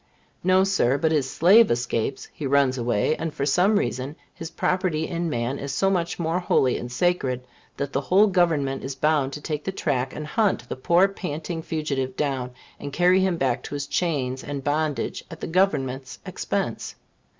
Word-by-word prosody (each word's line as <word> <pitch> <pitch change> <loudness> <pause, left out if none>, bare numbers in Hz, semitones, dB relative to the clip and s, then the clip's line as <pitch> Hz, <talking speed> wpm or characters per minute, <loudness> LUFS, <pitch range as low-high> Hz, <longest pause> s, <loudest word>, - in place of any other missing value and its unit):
No, 185 +1 +4
Sir. 165 -9 +2
But 160 +1 +1
his 145 -4 +1
slave 200 - +6
escapes 120 +2 -1
he 145 - -4
runs 135 -1 +3
away, 120 +3 +1
and, 165 0 -3
for 140 - -3
some 180 +9 +3
reason, 140 -6 -2 0.2
his 165 - -7
property 170 -3 0
in 170 0 -2
man 120 +1 -2
is 140 0 -4
so 195 0 +2
much 175 -2 -1
more 170 +1 0
holy 135 -7 +2
and 120 - -7
sacred, 130 -4 0 0.3
that 140 -1 -3
the 135 - +1
whole 190 +8 +4
Government 165 -8 +1
is 135 +1 -4
bound 145 -1 +1
to 150 - -6
take 150 -1 -4
the 195 - -2
track 130 -8 -2
and 150 - -5
hunt, 185 - 0
the - - -4
poor 170 +8 +4
panting 165 -3 -5
fugitive 140 -5 -3
down, 135 -4 -1 0.3
and 145 - -6
carry 180 +5 +4
him 190 -2 +1
back 130 -5 0
to - - -6
his 145 -1 -3
chains 135 -6 -1
and 140 -2 -5
bondage 150 0 -1
at - - -9
the - - -4
Government's 135 -8 0
expense. - - -3
150 Hz, 185 wpm, -24 LUFS, 135-175 Hz, 0.3 s, slave